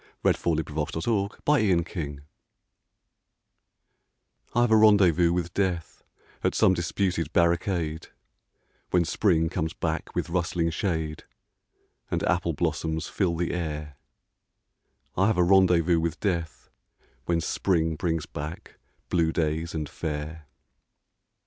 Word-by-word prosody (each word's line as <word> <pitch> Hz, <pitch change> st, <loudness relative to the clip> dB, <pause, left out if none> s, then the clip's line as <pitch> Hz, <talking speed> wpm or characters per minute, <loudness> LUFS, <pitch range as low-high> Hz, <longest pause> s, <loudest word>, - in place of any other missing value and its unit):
I -, -, +6 dB
HAVE -, -, -1 dB
A -, -, +5 dB
RENDEZVOUS 75 Hz, +2 st, -4 dB
WITH 105 Hz, -3 st, -1 dB
DEATH 85 Hz, -, 0 dB, 2.3 s
I 120 Hz, -, +4 dB
have 120 Hz, -2 st, +2 dB
a -, -, +7 dB
rendezvous 95 Hz, -6 st, +5 dB
with 85 Hz, -1 st, -2 dB
Death 90 Hz, -5 st, -2 dB, 0.4 s
At -, -, +1 dB
some 95 Hz, -, +5 dB
disputed 85 Hz, -2 st, -1 dB
barricade, 85 Hz, -2 st, +1 dB, 0.8 s
When 90 Hz, -1 st, +2 dB
Spring 80 Hz, -3 st, +2 dB
comes 80 Hz, -1 st, -2 dB
back 80 Hz, -1 st, -3 dB
with -, -, -2 dB
rustling 85 Hz, -1 st, 0 dB
shade 80 Hz, -4 st, -2 dB, 0.8 s
And -, -, -1 dB
apple -, -, +1 dB
blossoms 80 Hz, 0 st, -2 dB
fill 90 Hz, -4 st, 0 dB
the 85 Hz, 0 st, -1 dB
air 75 Hz, -4 st, -4 dB, 0.6 s
— -, -, -47 dB
I 95 Hz, +2 st, +3 dB
have 110 Hz, -, +1 dB
a 90 Hz, -, +4 dB
rendezvous 90 Hz, -2 st, +4 dB
with 85 Hz, +1 st, -2 dB
Death 85 Hz, -6 st, -3 dB, 0.6 s
When 85 Hz, -1 st, +2 dB
Spring 80 Hz, 0 st, 0 dB
brings 80 Hz, -1 st, -1 dB
back 75 Hz, +3 st, -8 dB, 0.3 s
blue 85 Hz, -2 st, +2 dB
days 80 Hz, +1 st, -1 dB
and 75 Hz, -2 st, -2 dB
fair. 75 Hz, 0 st, -5 dB
85 Hz, 125 wpm, -26 LUFS, 80-90 Hz, 2.3 s, a